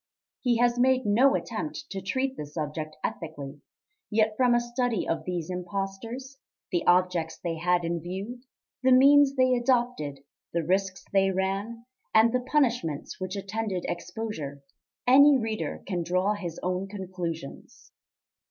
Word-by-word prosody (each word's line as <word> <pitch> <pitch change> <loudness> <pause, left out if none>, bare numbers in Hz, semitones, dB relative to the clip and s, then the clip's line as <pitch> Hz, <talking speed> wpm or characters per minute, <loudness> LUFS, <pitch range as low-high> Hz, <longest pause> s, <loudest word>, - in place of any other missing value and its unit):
He 245 -3 +2
has 240 0 +2
made 260 0 +3
no 245 +7 +4
attempt 300 +7 -4
to 195 -2 -4
treat 260 +7 -1
the 150 - -6
subject 155 +1 -5
ethically; 145 -3 -5 0.5
yet 215 0 +2
from 245 0 +4
a - - +4
study 240 -3 -1
of 160 -1 -2
these 175 -1 -3
impostors, 200 +9 -5 0.3
the 175 - +1
objects 175 -2 +2
they 165 -2 -3
had 175 +1 +1
in 170 0 -2
view, 195 +8 -6 0.4
the 260 0 +4
means 275 +1 +6
they 255 -1 +4
adopted, 240 - 0 0.3
the 170 -1 0
risks 185 +2 -1
they 195 -1 +4
ran, 195 +5 -2 0.3
and 225 +2 +6
the 255 - +3
punishments 245 - 0
which 185 +1 -4
attended 200 -1 -3
exposure, 175 -7 -5 0.4
any 280 +3 +7
reader 225 -3 -3
can 180 -3 -2
draw 185 +4 +1
his 180 -5 -6
own 185 +2 -1
conclusions. 180 -6 -7
195 Hz, 145 wpm, -27 LUFS, 175-245 Hz, 0.5 s, any